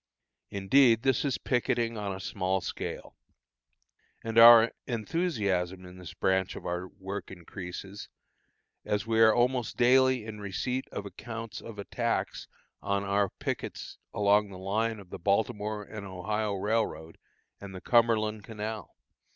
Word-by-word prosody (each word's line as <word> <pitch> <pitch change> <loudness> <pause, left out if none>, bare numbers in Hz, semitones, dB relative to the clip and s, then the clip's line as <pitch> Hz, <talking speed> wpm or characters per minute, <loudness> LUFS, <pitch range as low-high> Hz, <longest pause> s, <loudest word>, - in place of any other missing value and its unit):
Indeed, 115 +4 +4
this 135 -3 +2
is 140 -2 0
picketing 120 -2 0
on 105 -2 -3
a 95 - -5
small 95 0 -1
scale. - - -6 1.1
And 115 0 +2
our 115 0 +9 0.2
enthusiasm 100 - -1
in 90 0 -12
this 90 -3 -10
branch 95 0 0
of - - -9
our 90 +1 -3
work 95 +1 -7
increases, 95 +2 -8 0.7
as 105 0 -1
we 115 0 +1
are 110 -1 +8
almost 120 +1 +1
daily 130 -1 +4
in 110 -1 -7
receipt 125 +6 -2
of 100 - -5
accounts 115 0 -7
of 115 -2 -10
attacks 115 +3 -2 0.3
on 100 0 -1
our 100 0 +1
pickets - - -5
along 105 0 +3
the 95 - -9
line 110 +4 -1
of 95 -3 -14
the - - -7
Baltimore 105 +2 0
and 105 0 -8
Ohio 100 +2 -2
Railroad 95 -5 -2 0.4
and 100 -1 -9
the - - -6
Cumberland 110 -3 +2
Canal. 110 -1 -6
105 Hz, 140 wpm, -29 LUFS, 95-115 Hz, 1.1 s, our